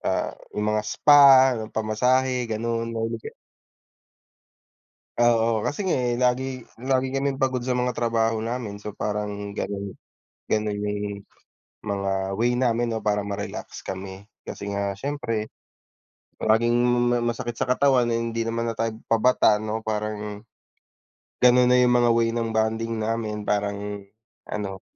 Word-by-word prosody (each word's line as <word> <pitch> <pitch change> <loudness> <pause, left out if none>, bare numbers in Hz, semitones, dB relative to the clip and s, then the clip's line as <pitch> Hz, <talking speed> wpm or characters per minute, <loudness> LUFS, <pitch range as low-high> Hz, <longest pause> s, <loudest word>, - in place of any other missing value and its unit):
ah, - - -1 0.2
yung 105 0 0
mga 105 0 +1
spa, 135 -3 +7 0.2
pamasahe 125 +3 +1
gano'n. 115 +1 -2
Mahilig 115 0 -2
ka - - -15 1.8
Oo, 115 -2 +3
kasi 170 - -2
nga 185 - +2
eh 120 -2 0
lagi 130 0 0 0.2
lagi 130 0 +1
kaming 135 0 -1
pagod 130 -2 0
sa 130 - -3
mga 125 0 0
trabaho 115 -1 0
namin, 115 -3 -4
so 105 - -5
parang 105 0 -4
ganun, 100 -1 -4 0.6
ganun 105 -1 0
'yung 105 -1 -3 0.6
mga 95 -2 -2
way 120 +1 +2
namin 120 -1 +1
'no 110 -1 -3
para 105 -1 +1
ma-relax 100 0 -6
kami. 95 +1 -7 0.2
Kasi 100 0 -5
nga 100 0 -2
siyempre, 115 -4 -3 0.9
laging 115 +2 +2 0.3
may 120 - +2
masakit 120 0 -3
sa - - 0
katawan, 125 -1 +3
ay 115 0 0
hindi 115 0 -2
naman 115 0 -1
na 115 - -7
tayo 115 -1 -1 0.2
pabata 115 -2 +4
'no 110 +1 -4
parang, 105 0 -4 1.0
ganun 125 0 +6
na 125 - +5
'yung 125 -1 +4
mga 120 -1 +4
way 115 0 +2
ng 115 -1 -1
bonding 110 +1 0
namin, 110 -1 -2
parang 100 0 -2 0.5
ano, 100 -2 -4
115 Hz, 140 wpm, -24 LUFS, 105-125 Hz, 1.8 s, spa